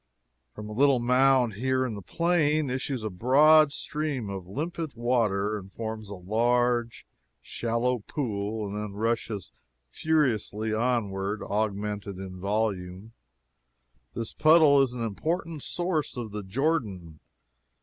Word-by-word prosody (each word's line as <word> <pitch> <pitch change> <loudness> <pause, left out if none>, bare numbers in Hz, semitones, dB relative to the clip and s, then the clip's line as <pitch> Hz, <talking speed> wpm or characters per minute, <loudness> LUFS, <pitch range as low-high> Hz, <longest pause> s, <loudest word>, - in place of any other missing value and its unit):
From 105 0 -7
a 105 - -7
little 135 +3 +4
mound 125 -1 +3
here 130 +4 0
in 120 - -3
the 100 - -7
plain 155 - +1
issues 130 -2 -3
a 110 - -2
broad 145 +9 +5
stream 145 -9 -3
of 95 -2 -6
limpid 155 - -4
water 110 -4 0
and 95 0 -13
forms 110 -1 -6
a 100 - -6
large 120 +3 0 0.3
shallow 120 +2 -1
pool, 105 -3 -3
and 100 - -6
then 105 -1 -4
rushes 110 -1 -2 0.4
furiously 110 - 0
onward, 110 -4 -1
augmented 105 -1 -2
in 95 -1 -8
volume. 100 0 -2 1.0
This 115 -2 -4
puddle 155 -3 +6
is 130 -3 +1
an 120 -2 -4
important 160 - -3
source 175 -5 -2
of 115 -3 -5
the 105 0 -4
Jordan. 100 - -2
115 Hz, 130 wpm, -27 LUFS, 105-135 Hz, 1.0 s, puddle